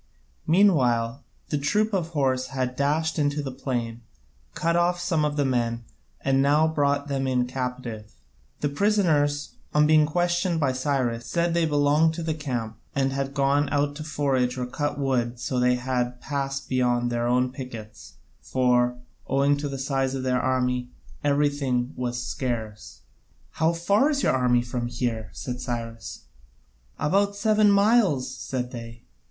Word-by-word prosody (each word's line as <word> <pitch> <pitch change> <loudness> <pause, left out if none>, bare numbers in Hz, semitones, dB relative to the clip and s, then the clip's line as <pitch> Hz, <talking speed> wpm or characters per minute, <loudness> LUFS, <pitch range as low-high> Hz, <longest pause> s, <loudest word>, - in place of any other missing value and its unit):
Meanwhile 135 - +3 0.3
the 150 - 0
troop 210 +9 +1
of 180 -4 0
horse 135 -5 0
had 130 -1 -3
dashed 155 +4 0
into 145 0 0
the 135 - -4
plain, 120 -3 -3 0.5
cut 170 0 +1
off 175 +1 +2
some 175 -3 0
of 150 0 -1
the 145 - +2
men, 120 -2 0 0.4
and 135 0 +2
now 150 +3 +4
brought 145 -2 0
them 135 -1 -1
in 125 -1 +1
captive. 125 -4 -5 0.5
The 145 - +1
prisoners, 150 -5 +1 0.2
on 150 0 +5
being 155 0 +5
questioned 175 +1 0
by 140 -4 +2
Cyrus, 130 -3 -1
said 170 0 0
they 170 -1 +2
belonged 150 +2 +3
to 170 - -4
the 160 -1 -1
camp 120 -8 -4 0.2
and 135 -1 +1
had 135 0 -3
gone 140 +1 +2
out 145 0 0
to 155 - -6
forage 135 -4 0
or 125 - -2
cut 145 +4 -3
wood 135 -3 +1
and 120 +1 -7
so 125 0 -2
had 125 0 0
passed 140 0 -3
beyond 120 -1 +1
their 120 0 0
own 125 +1 +2
pickets, 115 - -9 0.3
for, 125 -1 +2 0.3
owing 140 +2 +3
to 145 0 -3
the 135 - -4
size 135 0 -1
of 130 - -3
their 125 -1 +1
army, 125 -1 0 0.3
everything 140 -3 +1
was 125 -1 -3
scarce. 110 - -4 0.5
"How 160 +1 +1
far 200 - +2
is 285 -2 0
your - - +3
army 125 -2 +2
from 120 0 -3
here?" 120 -2 -2
asked 125 +3 -6
Cyrus. 115 -2 -5 0.8
"About 200 +6 +1
seven 215 0 +3
miles," 200 - +3
said 125 -2 -4
they. 115 -1 -9
135 Hz, 160 wpm, -25 LUFS, 125-150 Hz, 0.8 s, on